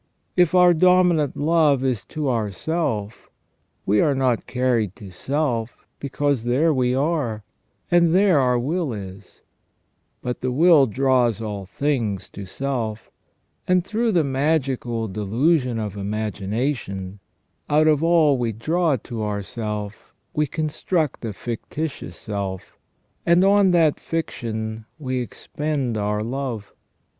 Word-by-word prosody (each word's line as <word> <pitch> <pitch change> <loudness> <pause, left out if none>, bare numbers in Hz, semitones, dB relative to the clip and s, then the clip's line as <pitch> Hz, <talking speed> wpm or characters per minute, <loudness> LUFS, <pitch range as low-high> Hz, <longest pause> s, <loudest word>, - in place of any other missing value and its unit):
If 180 -1 +3
our 180 -1 +7
dominant 175 -3 +3
love 150 -3 +3
is 130 -5 0
to 155 -2 -4
ourself, 115 - -2 0.6
we 105 +1 +3
are 145 - +2
not 130 -3 0
carried 120 -6 0
to 100 -3 -11
self, 125 - -2
because 140 -2 -1
there 140 +7 +2
we 125 -2 +1
are, 135 -7 -1 0.5
and 170 -1 +5
there 185 -3 +4
our 125 -2 +2
will 150 +3 -1
is; 95 -2 -9 0.8
but 125 0 -3
the 130 - -1
will 155 0 +5
draws 125 -2 +2
all 105 -4 -5
things 110 -3 -2
to 100 -1 -8
self, 115 -2 -3 0.6
and 180 -1 +3
through 225 +3 0
the 170 -3 +3
magical 135 -5 0
delusion 120 - +1
of 105 -3 -4
imagination, 105 0 -3 0.5
out 150 +1 +4
of 155 -1 +3
all 160 -5 +4
we 120 -2 0
draw 155 - +1
to 115 -1 -6
ourself 105 0 -5 0.2
we 150 0 +1
construct 155 0 -2
a 110 - -2
fictitious 130 +8 -5
self, 100 -3 -5 0.5
and 170 +2 +4
on 200 -1 +5
that 165 -4 +3
fiction 110 -8 -4
we 130 -4 -2
expend 140 0 -3
our 105 0 -1
love. 120 -3 -4
130 Hz, 125 wpm, -22 LUFS, 110-155 Hz, 0.8 s, our